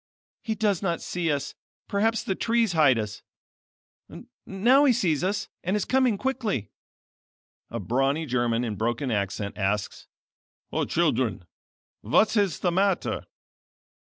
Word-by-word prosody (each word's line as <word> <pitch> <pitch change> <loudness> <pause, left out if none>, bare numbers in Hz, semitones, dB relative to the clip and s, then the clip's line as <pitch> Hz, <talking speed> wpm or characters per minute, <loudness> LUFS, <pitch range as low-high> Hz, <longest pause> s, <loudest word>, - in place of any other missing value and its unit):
He 220 -2 -2
does 205 -4 +1
not 170 -4 -1
see 170 -3 -2
us, 145 -1 -2 0.3
perhaps 225 +3 +1
the 190 - -1
trees 230 -1 +1
hide 145 -6 +5
us. 105 -1 -4 1.3
Now 240 +9 +4
he 265 - +5
sees 175 -9 0
us, 205 +2 -1 0.2
and 185 +4 0
is 205 - -2
coming 255 -5 +2
quickly." 230 - -2 1.0
A 115 - -4
brawny 135 - 0
German 120 -3 0
in 110 -4 -3
broken 120 +5 -1
accent 100 0 -2
asks: 100 0 -2 0.6
"O - - 0
children, 90 - 0 0.5
what 215 - +2
is 200 -6 +1
the 175 - +2
matter?" 190 +1 0
170 Hz, 130 wpm, -26 LUFS, -, 1.3 s, hide